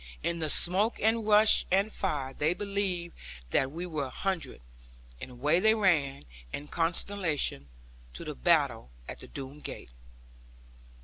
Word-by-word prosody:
In 170 0 -1
the 155 -1 -1
smoke 195 +9 +2
and 220 0 +1
rush, 210 0 +6
and 195 +3 +3
fire, 145 -11 -2
they 155 +5 0
believed 195 -4 -2 0.4
that 135 0 +2
we 170 +4 -5
were 155 -5 -3
a - - -6
hundred; 190 +4 -3 0.6
and - - -6
away 145 +7 +1
they 220 +3 +4
ran, 150 - +1 0.3
in 145 +1 -6
consternation, 165 - -1 0.5
to - - -7
the - - -4
battle 60 0 +2 0.2
at - - -7
the - - -11
Doone 140 +1 -8
gate. 105 - -8
170 Hz, 145 wpm, -29 LUFS, 145-200 Hz, 0.6 s, rush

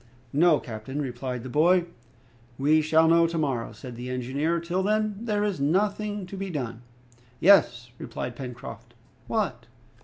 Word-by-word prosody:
"No, 155 0 +5
captain," 120 +4 -6
replied 125 -2 -4
the - - -6
boy. 170 +6 +4 0.7
"We 150 +3 +4
shall 160 +1 +4
know 165 0 +5
to 165 0 -3
morrow," 135 -7 -1
said 125 -3 -9
the 125 +2 -6
engineer; 135 +7 -1
"till 175 +3 -1
then, 215 +1 +1
there 210 -3 0
is 205 -5 -1
nothing 205 +5 0
to 185 - -9
be 195 0 -4
done." 120 -8 -4 0.6
"Yes," 150 -10 +4
replied 120 - -5
Pencroft. 125 -1 -9 0.3
"What?" - - -2
155 Hz, 150 wpm, -26 LUFS, 125-185 Hz, 0.7 s, No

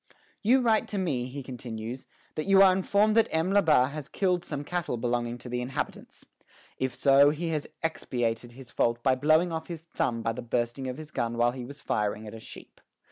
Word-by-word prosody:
" - - -36
"You 255 +5 +4
write 225 -3 +2
to 205 - -4
me," 140 -10 -1
he 140 +2 -7
continues, 120 -1 -7 0.3
"that 155 - -4
you 195 0 +7
are 190 -1 +7
informed 200 +3 +2
that 225 - +5
M. 165 +4 0
Labat 155 -9 +4
has 150 -2 -6
killed 180 -3 0
some 145 -4 -5
cattle 175 -5 -2
belonging 120 0 -1
to 125 - -10
the 125 0 -2
inhabitants. 130 +2 -5 0.5
If 130 -1 -1
so, 140 +2 +6
he 160 +3 -2
has 155 -2 -2 0.2
expiated 120 -7 -2
his 130 -1 -12
fault 120 0 0
by 130 - +4
blowing 155 +6 +3
off 160 -1 -4
his 165 -2 -7
thumb 120 -8 -2
by 115 - 0
the 125 - -6
bursting 120 +2 -2
of 125 0 -4
his 155 -1 -9
gun 115 -3 -2
while 120 0 +3
he 125 -1 -7
was 140 +2 -10
firing 105 +1 -1
at 105 - -8
a 115 - -8
sheep. - - -12
135 Hz, 215 wpm, -28 LUFS, 120-165 Hz, 0.5 s, you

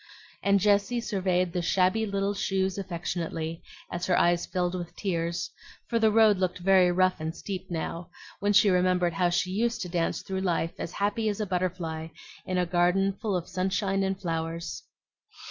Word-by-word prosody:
and 200 0 +3
Jessie 205 +4 +2
surveyed 185 -5 0
the 180 - 0
shabby 185 +5 +2
little 200 0 0
shoes 190 -1 -1
affectionately, 170 -3 -4 0.3
as 175 +1 -3
her 180 - +3
eyes 175 0 +3
filled 180 -1 -1
with 175 -2 -5
tears; 170 -3 -2 0.3
for 230 - 0
the 220 -1 +4
road 215 -2 +5
looked 185 -1 0
very 185 0 +4
rough 185 +1 +2
and 160 +1 -4
steep 190 -2 -6
now, 165 0 -4 0.3
when 205 +1 +1
she 210 -1 +5
remembered 180 -1 +2
how 175 +1 +2
she 185 +1 0
used 230 +4 0
to 180 - -4
dance 170 -1 -1
through 190 0 -3
life 170 -3 0
as 170 - -5
happy 210 +2 0
as 205 - -3
a 215 - 0
butterfly 175 -4 -2 0.4
in 185 - -1
a 180 - +2
garden 180 +3 +2
full 200 0 -2
of 175 -2 -2
sunshine 190 +1 0
and 190 0 -1
flowers. 165 -1 -3
185 Hz, 180 wpm, -28 LUFS, 175-195 Hz, 0.4 s, road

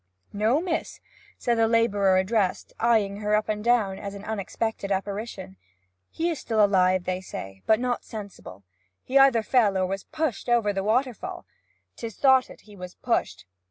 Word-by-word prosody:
'No, 220 +7 +2
miss,' 340 -1 -3 0.4
said 235 -1 0
the 225 - +4
labourer 205 -4 +3
addressed, 190 0 0
eyeing 220 -4 +2
her 210 0 0
up 215 - 0
and 210 -1 -2
down 220 -5 +2
as 200 -1 -6
an 200 - -9
unexpected 220 0 -3
apparition. 195 - -4 0.5
'He 335 +1 -1
is 315 - -4
still 220 -4 +2
alive, 185 -2 +2
they 185 +1 -3
say, 95 - -8
but 220 0 +4
not 245 -1 -1
sensible. 200 - -9 0.4
He 270 +2 +3
either 265 -5 +5
fell 215 -5 +3
or 185 - +1
was 195 +1 -4
pushed 310 -7 -3
over 230 -4 +2
the 195 0 -2
waterfall; 255 - -1 0.5
'tis 230 -3 -6
thoughted 265 -2 +3
he 210 -1 -16
was 180 -1 -9
pushed. - - -2
215 Hz, 165 wpm, -25 LUFS, 195-240 Hz, 0.5 s, either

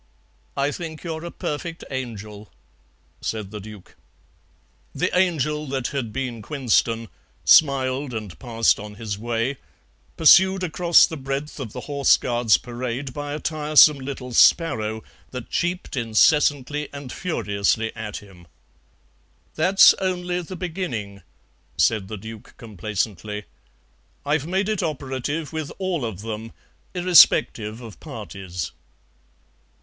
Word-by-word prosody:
"I 140 +1 +1
think 160 -1 -7
you 170 -2 -3
are 160 +1 -7
a 170 - -5
perfect 165 +1 -5
angel," 110 -5 -6 0.7
said 105 -3 -4
the 105 - -6
Duke. 105 -2 -12 1.0
The 180 +6 -1
Angel 155 -5 +1
that 130 -2 -2
had 130 -6 -3
been 125 -2 -4
Quinston 115 -3 0 0.4
smiled 135 -2 +4
and 105 -8 -6
passed 115 -2 +2
on 105 0 -9
his 105 -2 -5
way, 120 +4 -2 0.6
pursued 190 +4 +6
across 170 0 +5
the 160 - -6
breadth 140 +2 -4
of 120 -6 -5
the 125 - -7
Horse 140 -1 +3
Guards 120 -3 +2
Parade 125 +2 -5
by 145 +1 -5
a - - -4
tiresome 150 -2 +5
little 130 -2 -6
sparrow 110 -7 +3 0.3
that 125 -2 -8
cheeped 175 -2 -2
incessantly 145 +4 +2
and 140 -3 -8
furiously 110 - -1
at 110 -2 -5
him. 95 -4 -14 1.1
"That's 185 +5 +6
only 180 -2 -1
the 180 +2 -8
beginning," 150 - -5 0.6
said 105 -4 +2
the 110 - -6
Duke 110 +2 -11
complacently; 105 -1 -4 0.8
"I've 145 +1 0
made 190 +3 0
it 215 -3 -1
operative 145 0 -3
with 155 -2 -4
all 185 -6 -2
of 110 -5 -4
them, 110 +1 -6 0.4
irrespective 125 -10 +4
of 110 -9 -11
parties." 90 -4 -7
130 Hz, 125 wpm, -23 LUFS, 110-155 Hz, 1.1 s, pursued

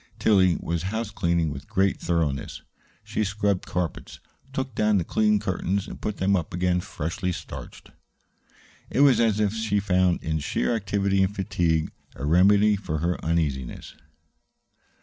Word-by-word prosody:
Tillie 95 -5 +4
was 85 -1 -2
house 110 0 -3
cleaning 85 -5 0
with 70 0 -9
great 95 0 +1
thoroughness. 80 -5 -2 0.4
She 110 - -2
scrubbed 100 -1 -1
carpets, 90 -2 -4 0.3
took 130 -2 -3
down 105 -1 +2
the 90 - +1
clean 105 +4 +2
curtains, 95 -1 -2
and - - -9
put 105 - -3
them 100 +1 +2
up 85 -1 -3
again 90 0 +1
freshly 85 +3 -3
starched. - - -9 1.0
It 135 - +1
was 135 -5 +6
as 110 -3 +2
if 105 -1 +1
she 110 -2 0
found 90 -2 +1
in 80 0 -1
sheer 75 +10 -1
activity 100 -2 0
and 95 +2 +1
fatigue 85 -4 0 0.2
a 65 - -5
remedy 100 +6 +5
for 85 -6 -3
her 85 +3 -2
uneasiness. 75 -6 -2
95 Hz, 150 wpm, -25 LUFS, 85-105 Hz, 1.0 s, was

